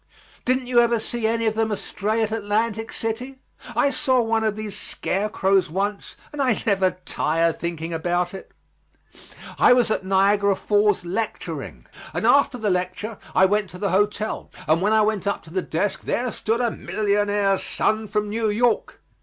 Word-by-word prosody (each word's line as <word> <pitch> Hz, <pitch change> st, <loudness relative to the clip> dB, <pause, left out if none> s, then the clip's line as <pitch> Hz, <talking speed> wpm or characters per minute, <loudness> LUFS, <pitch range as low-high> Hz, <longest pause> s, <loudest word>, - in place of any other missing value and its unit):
Didn't 255 Hz, 0 st, +1 dB
you 245 Hz, -1 st, +3 dB
ever 235 Hz, -1 st, +3 dB
see 225 Hz, 0 st, -2 dB
any 230 Hz, 0 st, 0 dB
of 220 Hz, -, +2 dB
them 220 Hz, 0 st, 0 dB
astray 215 Hz, +2 st, -1 dB
at 215 Hz, -, -2 dB
Atlantic 220 Hz, +1 st, -1 dB
City? 245 Hz, +4 st, -4 dB, 0.4 s
I 280 Hz, -, +3 dB
saw 260 Hz, -1 st, +2 dB
one 225 Hz, -1 st, +1 dB
of 215 Hz, -1 st, 0 dB
these 215 Hz, -2 st, -6 dB
scarecrows 195 Hz, -2 st, 0 dB
once 200 Hz, +4 st, -3 dB, 0.2 s
and 295 Hz, -, -3 dB
I 250 Hz, -6 st, +1 dB
never 195 Hz, -4 st, +2 dB
tire 165 Hz, +2 st, +1 dB
thinking 170 Hz, 0 st, -4 dB
about 175 Hz, +2 st, -1 dB
it. 190 Hz, -, -9 dB, 1.1 s
I -, -, +7 dB
was 245 Hz, -3 st, +3 dB
at 215 Hz, -, 0 dB
Niagara 200 Hz, +1 st, +3 dB
Falls 205 Hz, -3 st, +1 dB
lecturing, 205 Hz, +6 st, -4 dB, 0.3 s
and -, -, -1 dB
after 280 Hz, -2 st, +4 dB
the 215 Hz, -4 st, 0 dB
lecture 185 Hz, +4 st, -3 dB, 0.2 s
I 190 Hz, -, +6 dB
went 205 Hz, 0 st, +1 dB
to 180 Hz, -, -10 dB
the 200 Hz, +1 st, -1 dB
hotel, 205 Hz, +2 st, 0 dB, 0.2 s
and 160 Hz, +2 st, +3 dB
when 205 Hz, +3 st, +2 dB
I 220 Hz, 0 st, +4 dB
went 210 Hz, -2 st, 0 dB
up 200 Hz, -, -1 dB
to 165 Hz, -, -14 dB
the 185 Hz, -, 0 dB
desk 180 Hz, +4 st, -2 dB
there 245 Hz, 0 st, -1 dB
stood 225 Hz, +3 st, -1 dB
there 240 Hz, -, +2 dB
a -, -, -7 dB
millionaire's 205 Hz, -1 st, +1 dB
son 215 Hz, 0 st, 0 dB
from 210 Hz, +1 st, -1 dB
New 220 Hz, +1 st, -1 dB
York. 230 Hz, +3 st, 0 dB
210 Hz, 180 wpm, -23 LUFS, 195-225 Hz, 1.1 s, I